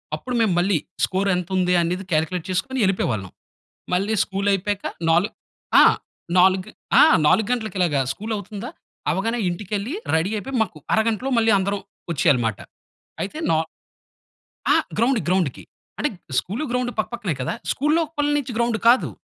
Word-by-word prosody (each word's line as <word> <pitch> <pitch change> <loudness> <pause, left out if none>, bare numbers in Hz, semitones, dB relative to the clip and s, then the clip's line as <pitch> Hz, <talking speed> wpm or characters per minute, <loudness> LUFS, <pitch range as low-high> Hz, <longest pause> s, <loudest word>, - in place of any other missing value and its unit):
అప్పుడు 250 -1 -5
మేము 210 -5 +3
మళ్ళీ 185 -1 +2 0.3
స్కోర్ 195 +1 -1
ఎంత 180 -1 -3
ఉంది? 180 0 +2
అనేది 180 +3 -2
క్యాలిక్యులేట్ 160 +2 0
చేసుకొని 255 +8 -1
వెళ్ళిపోయేవాళ్ళం. 110 - 0 0.7
మళ్ళీ 200 +4 +1
స్కూలయిపోయాక 200 +1 -1 0.2
నాలు 175 +6 +3 0.5
ఆ! - - +8 0.5
నాలుగ్ 185 0 +4 0.3
ఆ! - - +9 0.2
4 200 +6 +4
గంటలకి 220 -4 -2
ఇలాగా 150 -6 +2
స్కూల్ 220 +7 -6
అవుతుందా, 205 +4 -7 0.4
అవ్వగానే 215 +9 0
ఇంటికెళ్ళి, 205 - -3 0.2
రెడీ 165 +5 +1
అయిపోయి, 265 +5 -4
మాకు 180 -7 -5 0.2
అరగంటలో 225 +4 +1
మళ్ళీ 225 -1 +4
అందరం 200 +1 -1 0.3
వచ్చేయాలమాట. 120 -7 +2 0.7
అయితే 205 +11 -6
నా 160 - +3 1.2
ఆ! - - +5 0.2
గ్రౌండ్ 235 +2 +3
గ్రౌండ్‌కి 180 -8 0 0.4
అంటే 295 - +1 0.3
స్కూలు, 210 +11 -4
గ్రౌండు 250 -1 0
పక్కపక్కనే 215 -6 -2
కదా. 130 - -2 0.2
స్కూల్లోపలి 300 0 0
నుంచి 265 -3 -3
గ్రౌండ్ 235 -1 +1
కాదు, 255 - +4
200 Hz, 135 wpm, -22 LUFS, 180-235 Hz, 1.2 s, ఆ